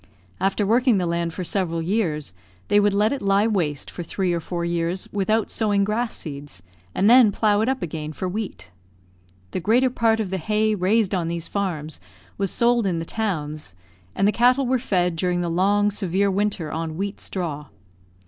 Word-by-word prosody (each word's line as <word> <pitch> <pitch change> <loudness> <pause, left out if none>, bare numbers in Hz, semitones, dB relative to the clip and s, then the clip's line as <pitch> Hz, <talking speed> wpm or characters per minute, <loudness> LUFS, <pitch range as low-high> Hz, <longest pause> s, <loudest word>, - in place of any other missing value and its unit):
After 195 +2 +1
working 240 +2 +3
the 180 - 0
land 170 0 -1
for 185 - -5
several 175 -2 0
years, 165 - -1 0.4
they 205 - +5
would 205 -1 +2
let 210 +3 +3
it 280 - -4
lie 200 +1 +3
waste 170 -10 -1
for - - -7
three 180 +1 -1
or 170 - 0
four 170 +1 -4
years 170 +2 -1
without 210 +2 0
sowing 205 -3 +1
grass 220 +3 -1
seeds, 140 - -8 0.3
and 195 - +2
then 240 -2 +7
plough 210 0 +2
it 225 - +1
up 265 0 -1
again 155 -2 -5
for 185 +4 -4
wheat. 200 - -5 0.8
The - - -2
greater 240 +8 +2
part 225 -2 +2
of 205 -4 -2
the 190 - -1
hay 215 +5 +1
raised 205 +1 +1
on 175 -3 0
these 170 0 -3
farms 160 -7 -3 0.4
was 195 -1 0
sold 235 -1 +2
in 175 -3 0
the 165 - -3
towns, 155 - -4 0.4
and 195 - +2
the - - +4
cattle 250 +4 +3
were 255 +1 +1
fed 180 -8 0
during 175 +1 0
the 175 - -1
long 205 +4 +2
severe 195 0 0
winter 195 -5 -1
on 160 -1 -4
wheat 200 +2 -3
straw. 150 -6 -4
195 Hz, 190 wpm, -23 LUFS, 170-215 Hz, 0.8 s, then